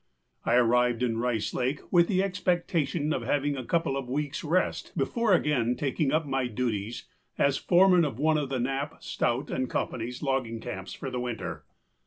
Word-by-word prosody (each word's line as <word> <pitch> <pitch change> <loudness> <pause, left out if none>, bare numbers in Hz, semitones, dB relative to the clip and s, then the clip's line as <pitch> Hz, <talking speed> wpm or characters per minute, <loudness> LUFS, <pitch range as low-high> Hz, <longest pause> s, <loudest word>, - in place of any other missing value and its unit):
I 120 - +3
arrived 125 0 +3
in 115 -2 0
Rice 120 -3 -1
Lake 130 +4 -1
with 170 -2 +5
the 190 -2 +2
expectation 170 -5 0
of - - -1
having 145 +4 0
a 130 - -4
couple 165 +1 0
of 135 -2 -3
weeksâ 145 +3 -3
rest 185 +1 0
before 215 - +1
again 125 -7 +1
taking 140 +1 0
up 155 +1 +1
my 135 -2 0
duties 115 -1 -3 0.3
as 140 -1 +3
foreman 180 -1 +5
of 140 -7 -2
one 155 +2 +2
of 140 -3 -3
Knapp, 135 +2 -2
Stout, 120 +4 -1
and 130 -1 -1
Companyâs 125 +3 -3
logging 130 -5 -1
camps 95 -3 -6
for 135 - -6
the 125 - -2
winter. 120 -2 -4
135 Hz, 175 wpm, -28 LUFS, 125-155 Hz, 0.3 s, with